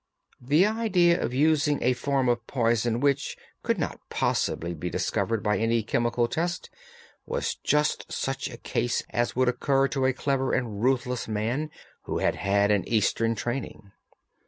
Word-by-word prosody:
The 145 +9 +4
idea 205 -6 +2
of - - -1
using 150 +2 +3
a 125 +2 +3
form 135 0 0
of 120 -1 0
poison 120 -1 +1
which 140 0 +1 0.2
could - - 0
not - - -3
possibly 85 +1 -1
be 85 +2 -4
discovered 115 +4 -1
by 105 0 +1
any 115 0 +1
chemical 120 +2 +1
test 170 +7 -3 0.6
was - - -1
just 150 0 +1
such 135 0 -2
a 120 - -9 0.2
one 120 - +1 0.2
as 120 +2 0
would 130 0 +2
occur 135 +2 +2
to 135 -2 +1
a 130 - +2
clever 135 0 0
and 115 -5 -2
ruthless 125 -1 0
man 115 +8 -1 0.4
who - - -2
had - - +1
had 100 +1 +2
an 100 -2 +2
Eastern 115 +1 +1
training. 115 -3 -5
125 Hz, 160 wpm, -26 LUFS, 115-140 Hz, 0.6 s, The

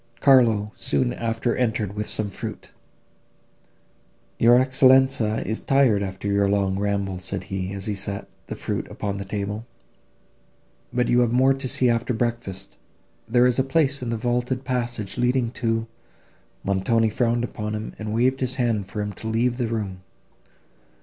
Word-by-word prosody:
Carlo 115 -6 +4
soon 65 -4 0
after 115 +1 -1
entered 110 -5 -1
with 105 0 -3
some 110 - -2
fruit: - - -7 1.7
"Your 120 +1 +6
Excellenza 130 -3 +4
is 110 - -1
tired 135 -7 +3
after 95 +1 -4
your 100 0 +2
long 100 -1 +1
ramble," 100 -2 -1
said 95 0 -5
he, 95 0 -4
as 100 0 -4
he 105 - -1
set 100 0 -2 0.2
the - - -5
fruit - - -4
upon 100 -1 -4
the 100 - -5
table; 105 +2 -4 1.3
"but 125 0 +1
you 120 - +3
have 120 -2 +2
more 130 +2 +4
to 135 0 -4
see 125 0 +2
after 120 +1 +1
breakfast. 110 -5 -3 0.5
There 120 +2 +4
is 125 0 +3
a - - +4
place 140 0 +1
in 125 - -3
the 115 - -1
vaulted 125 +2 -1
passage 120 -4 -2
leading 125 -1 +1
to—" 115 -2 -1 0.8
Montoni 110 +3 +1
frowned 120 0 +1
upon 105 -2 -4
him, 110 +1 -5
and 110 -1 -4
waved 125 +4 +2
his 130 0 -1
hand 115 -6 0
for 105 +2 -4
him 105 0 -3
to 110 - -8
leave 120 +2 +1
the 120 - 0
room. 100 -5 -4
115 Hz, 165 wpm, -24 LUFS, 100-125 Hz, 1.7 s, Your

